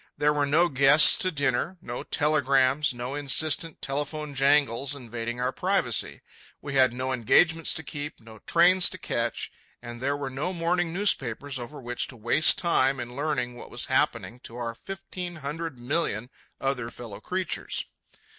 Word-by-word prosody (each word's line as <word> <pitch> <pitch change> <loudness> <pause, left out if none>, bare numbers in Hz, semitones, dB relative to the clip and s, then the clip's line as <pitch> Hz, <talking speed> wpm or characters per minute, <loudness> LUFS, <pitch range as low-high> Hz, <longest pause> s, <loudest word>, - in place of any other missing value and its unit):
There 150 0 +2
were 145 -1 0
no 165 +5 +4
guests 140 +1 +7
to 185 - +1
dinner, 145 +4 -1
no 120 -5 -6
telegrams, 140 -1 +2
no 125 +2 -6
insistent 150 +3 +1
telephone 145 +2 -4
jangles 140 -1 +2
invading 120 -2 -6
our 125 +1 0
privacy. 185 - -1 0.4
We 145 - -7
had 130 -2 +4
no 130 +2 -3
engagements 160 +7 +3
to 160 - -1
keep, 145 -1 -7
no 110 -1 -14
trains 175 +1 +5
to 185 - -3
catch, 115 - -3 0.3
and 120 0 -9
there 140 +2 -1
were 140 -2 -5
no 145 +8 -3
morning 175 0 0
newspapers 145 - 0
over 140 +5 -8
which 125 -1 -3
to 125 - -11
waste 120 +7 +4
time 135 -6 +2
in 120 0 -7
learning 140 -4 -2
what 120 - -11
was - - -3
happening 120 - 0
to 115 - -10
our 120 -1 -4
fifteen 180 +3 -8
hundred 155 0 -6
million 125 -3 -2 0.3
other 135 -4 -2
fellow 110 -4 -10
creatures. 185 +6 -3
140 Hz, 160 wpm, -26 LUFS, 125-160 Hz, 0.4 s, guests